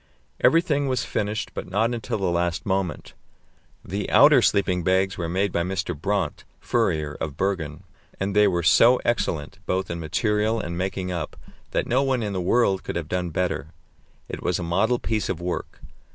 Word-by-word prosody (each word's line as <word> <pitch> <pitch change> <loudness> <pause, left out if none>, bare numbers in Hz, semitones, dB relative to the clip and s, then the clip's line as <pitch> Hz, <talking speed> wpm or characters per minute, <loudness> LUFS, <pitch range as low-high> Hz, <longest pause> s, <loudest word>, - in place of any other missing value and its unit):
Everything 150 -4 +3
was 130 -1 0
finished, 105 +1 -2
but - - -6
not 110 +5 +1
until 115 -2 -3
the 100 - -2
last 85 0 -1
moment. 95 -3 -2 0.7
The 100 +3 -3
outer - - +7
sleeping 90 -3 +2
bags 95 +2 +2
were 85 -2 -3
made 95 +3 0
by 85 - 0
Mr. 90 -1 -2
Brandt, 90 0 -2 0.2
furrier, 75 -2 0
of 75 -2 -4
Bergen, 85 -6 -2 0.4
and 95 +1 -2
they 105 0 +6
were 85 -2 0
so 115 +8 +6
excellent, 95 -6 -1
both 95 -1 -1
in 85 - -4
material 105 +7 0
and 85 -5 -4
making 95 0 -2
up, 85 -4 -4 0.3
that - - -1
no 125 +3 +2
one 130 -4 0
in 105 -1 -3
the 95 - -1
world 95 0 +2
could - - -5
have 85 -2 -3
done 90 -1 -1
better; 80 -3 -2 0.5
it - - -6
was - - 0
a - - -4
model 100 +9 +1
piece 110 -2 -2
of 90 - -2
work. 90 0 -4
95 Hz, 180 wpm, -24 LUFS, 85-105 Hz, 0.7 s, outer